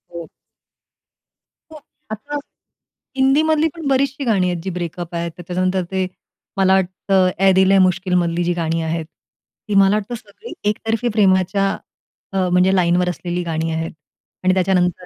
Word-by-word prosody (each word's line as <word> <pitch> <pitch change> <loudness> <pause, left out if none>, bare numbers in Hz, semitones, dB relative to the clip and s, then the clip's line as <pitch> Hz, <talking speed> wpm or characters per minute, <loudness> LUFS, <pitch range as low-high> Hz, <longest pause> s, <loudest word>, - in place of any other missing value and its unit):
हो. 170 -1 -7 1.4
हं, 310 - -10 0.3
आता. 285 +7 -5 0.8
हिंदीमधली 305 +4 +3
पण 325 -4 -5
बरीचशी 275 +1 +1
गाणी 195 -6 +2
आहेत, 175 -2 -4
जी 190 - -3
ब्रेकअप 175 0 -5
आहेत. 170 0 -2
तर 175 - -9
त्याच्यानंतर 185 +1 0
ते 190 -1 0 0.5
मला 190 -1 +4
वाटतं, 190 0 +2
ऐ 195 0 +5
दिल 190 0 +4
है 195 - +5
मुश्किल 185 0 +1
मधली 170 +1 -1
जी 175 +1 0
गाणी 165 -1 -1
आहेत, 160 0 -2 0.6
ती 210 - -1
मला 195 +1 +5
वाटतं 215 +3 -3
सगळी 230 - -11 0.2
एकतर्फी 225 +3 -2
प्रेमाच्या, 195 -1 +2 0.6
अ, 190 -1 +1
म्हणजे 180 +2 +3
लाईनवर 180 0 +2
असलेली 175 0 -3
गाणी 165 -1 -2
आहेत. 160 0 -3 0.5
आणि 185 0 +3
त्याच्यानंतर 180 -1 +1
185 Hz, 150 wpm, -19 LUFS, 175-205 Hz, 1.4 s, ऐ